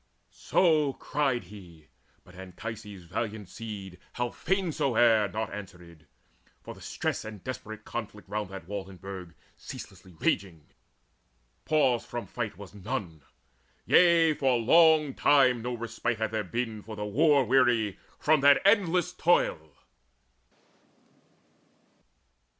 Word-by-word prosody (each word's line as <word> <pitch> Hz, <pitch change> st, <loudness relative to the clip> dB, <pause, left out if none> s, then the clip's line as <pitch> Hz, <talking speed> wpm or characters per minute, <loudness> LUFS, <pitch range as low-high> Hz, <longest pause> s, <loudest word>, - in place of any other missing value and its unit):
So 155 Hz, -6 st, +2 dB
cried 135 Hz, -6 st, -1 dB
he; 85 Hz, -6 st, -14 dB, 0.3 s
but 90 Hz, -, -18 dB
Anchises' 100 Hz, +2 st, -8 dB
valiant 105 Hz, +3 st, -4 dB
seed, 100 Hz, -6 st, -8 dB
How 120 Hz, -1 st, -2 dB
fain 190 Hz, -3 st, -1 dB
soe'er, 115 Hz, -6 st, +3 dB
naught 110 Hz, +3 st, -4 dB
answered, 90 Hz, -5 st, -11 dB, 0.6 s
for -, -, -8 dB
the -, -, -16 dB
stress -, -, -3 dB
Of 105 Hz, -3 st, -9 dB
desperate 110 Hz, -4 st, -7 dB
conflict 105 Hz, -3 st, -7 dB
round 105 Hz, -1 st, -3 dB
that 95 Hz, -3 st, -9 dB
wall 100 Hz, -1 st, -5 dB
and 95 Hz, -2 st, -13 dB
burg 95 Hz, -3 st, -8 dB, 0.2 s
Ceaselessly 95 Hz, -1 st, -11 dB
raging: 85 Hz, -6 st, -1 dB, 1.0 s
pause 135 Hz, -6 st, +2 dB
from 120 Hz, -1 st, -6 dB
fight 110 Hz, -7 st, -5 dB
was 100 Hz, -1 st, -11 dB
none: 100 Hz, -, -5 dB, 0.6 s
Yea, 170 Hz, -3 st, +5 dB
for 130 Hz, -4 st, +1 dB
long 155 Hz, +3 st, +5 dB
time 130 Hz, -4 st, +4 dB
no 125 Hz, +1 st, -3 dB
respite 115 Hz, 0 st, -3 dB
had 110 Hz, 0 st, -2 dB
there 110 Hz, -1 st, -1 dB
been 110 Hz, +2 st, -4 dB
For 110 Hz, +1 st, -9 dB
the 105 Hz, 0 st, -4 dB
war 140 Hz, +5 st, +3 dB
weary 120 Hz, -5 st, +2 dB, 0.2 s
from 155 Hz, -1 st, +3 dB
that 140 Hz, 0 st, +6 dB
endless 180 Hz, -3 st, +3 dB
toil. 80 Hz, -, +1 dB
110 Hz, 125 wpm, -28 LUFS, 95-135 Hz, 1.0 s, that